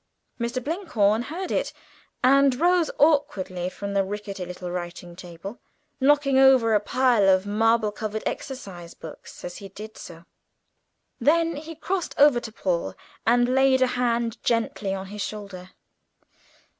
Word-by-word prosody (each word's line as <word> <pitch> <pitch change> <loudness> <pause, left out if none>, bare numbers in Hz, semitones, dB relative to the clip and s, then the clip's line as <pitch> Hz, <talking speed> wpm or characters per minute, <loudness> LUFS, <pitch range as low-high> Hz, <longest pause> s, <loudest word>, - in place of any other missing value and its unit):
Mr. 235 +2 -2
Blinkhorn 240 - +1
heard 345 +9 -5
it, - - -1 0.5
and 270 0 +4
rose 350 0 +3
awkwardly 190 - +1
from 200 +1 -6
the 195 -1 +2
rickety 200 -1 -5
little 180 0 -7
writing 175 0 -6
table, 180 +4 -9 0.4
knocking 275 -1 +3
over 260 -4 +5
a 210 - +5
pile 235 -1 +3
of 185 0 +3
marble 220 +1 +2
covered 215 0 -5
copy 195 -11 -6
books 160 - -11
as 175 0 -7
he 195 - -9
did 215 +3 -10
so. 170 -1 -11 0.9
Then 330 +2 +2
he 320 +3 -8
crossed 360 +3 -3
over 285 -4 +6
to 230 - -8
Paul 170 - -2 0.3
and 245 +2 +3
laid 265 0 +4
a 250 - 0
hand 235 -1 -1
gently 225 -4 0
on 190 0 -6
his 205 +2 -7
shoulder. 200 -4 -7
225 Hz, 145 wpm, -25 LUFS, 195-265 Hz, 0.9 s, over